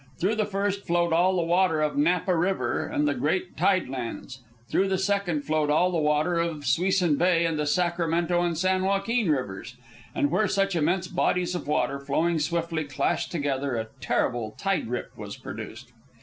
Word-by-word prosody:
Through 195 +5 +1
the 215 - +1
first 200 0 -2
flowed 170 -1 +2
all 180 +3 +3
the 175 - +1
water 170 -2 +2
of 150 - -1
Napa 180 +5 +2
River 165 -8 0
and 150 0 0
the 145 - +2
great 180 +6 -1
tide 185 -6 +2
lands; 130 +1 -6 0.3
through 195 - +1
the 190 0 0
second 190 -5 0
flowed 155 -1 0
all 175 +5 +3
the 170 - 0
water 150 +3 +1
of 165 -3 -2
Suisun 175 +3 +2
Bay 170 -1 +3
and 165 -2 -1
the 150 - 0
Sacramento 170 0 +1
and 170 -2 0
San 185 +2 +1
Joaquin 200 +2 +1
rivers. 125 -4 -2 0.4
And 290 -4 +1
where 215 - +2
such 195 0 0
immense 175 +3 +1
bodies 180 0 0
of 175 - -4
water, 140 -2 0
flowing 160 +4 0
swiftly, 165 +1 -1
clashed 130 -2 -1
together, 140 -4 -1
a 110 -1 -3
terrible 120 -4 -1
tide 195 -7 -1
rip 125 +2 -5
was - - -8
produced. 120 +2 -8
170 Hz, 180 wpm, -26 LUFS, 145-185 Hz, 0.4 s, all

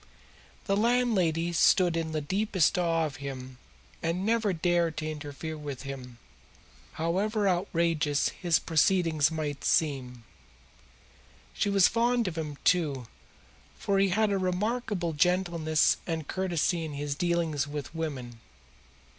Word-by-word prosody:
The 195 - +1
landlady 200 -8 +1
stood 175 +1 +4
in 165 -1 -2
the 155 -1 -2
deepest 190 +2 +1
awe 165 -2 +1
of 150 0 -6
him 130 -3 -7 0.4
and 170 +3 -1
never 220 -2 +2
dared 170 -1 +1
to 155 - -3
interfere 150 +1 -6
with 145 -4 -7
him, 130 -3 -8 0.8
however 200 +6 0
outrageous 170 -5 +1
his 175 -2 +1
proceedings 160 -2 +2
might 150 -3 -4
seem. 130 -6 0 1.3
She - - 0
was 195 -2 +5
fond 235 -1 +1
of 175 - -3
him, 150 -3 -4
too, 150 -8 +1 0.7
for 195 -1 0
he 195 0 +3
had 215 +3 +2
a 195 - +1
remarkable 185 -1 -1
gentleness 170 -1 +2
and 160 -3 -3
courtesy 175 -2 0
in 155 -2 -5
his 145 0 -3
dealings 165 -3 0
with 145 0 -6
women. 135 -8 -5
165 Hz, 130 wpm, -28 LUFS, 150-185 Hz, 1.3 s, was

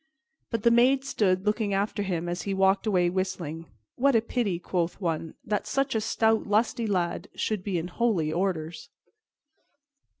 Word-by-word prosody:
But 230 -3 -2
the 235 - +5
maids 260 +3 +4
stood 185 -5 +1
looking 210 -1 +1
after 205 +1 -1
him 175 -4 -2
as 175 +1 -3
he 195 -1 -2
walked 195 +2 +2
away 180 -4 +3
whistling. 175 -3 -3 0.3
"What 275 0 +3
a 225 - +5
pity," 230 -6 -1
quoth 175 0 -2
one, 165 -3 -3
"that 210 -1 -1
such 275 0 0
a 220 - 0
stout, 220 0 +1
lusty 220 +2 +1
lad 180 -4 -1
should 215 -4 -2
be 195 -3 -1
in 165 +1 -3
holy 180 -6 0
orders." 170 -3 -2
195 Hz, 165 wpm, -27 LUFS, 175-225 Hz, 0.3 s, the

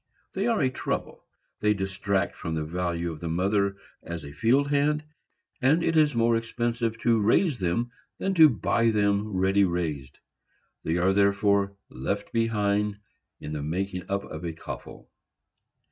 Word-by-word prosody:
They - - -1
are 230 -2 +2
a 130 -3 +2
trouble; - - -4 0.3
they 105 0 +2
detract 95 0 -1
from 80 -4 -4
the 80 - -1
value 85 +1 -2
of 80 - -8
the 85 - -4
mother 100 +3 +1 0.3
as 85 -1 -6
a 70 - -8
field 130 - +2
hand, 150 +1 +2 0.6
and 150 +6 +3
it 165 - +1
is 150 -4 +4
more 115 0 +3
expensive 115 0 -1
to 115 -2 +3
raise 125 - +2
them 100 +7 -1 0.3
than 195 - -1
to 160 -4 +8
buy 115 -2 +1
them 100 -1 +1
ready 95 0 +2
raised; 80 -7 -2 0.7
they 80 +2 0
are 90 +2 +3
therefore 100 0 +2 0.2
left 100 +11 -4
behind 105 -3 +1 0.4
in 75 - -6
the 75 - -3
making 90 +4 -3
up 100 0 -1
of 80 +1 -8
a 85 -1 -3
coffle. 80 - -9
100 Hz, 160 wpm, -26 LUFS, 90-115 Hz, 0.7 s, to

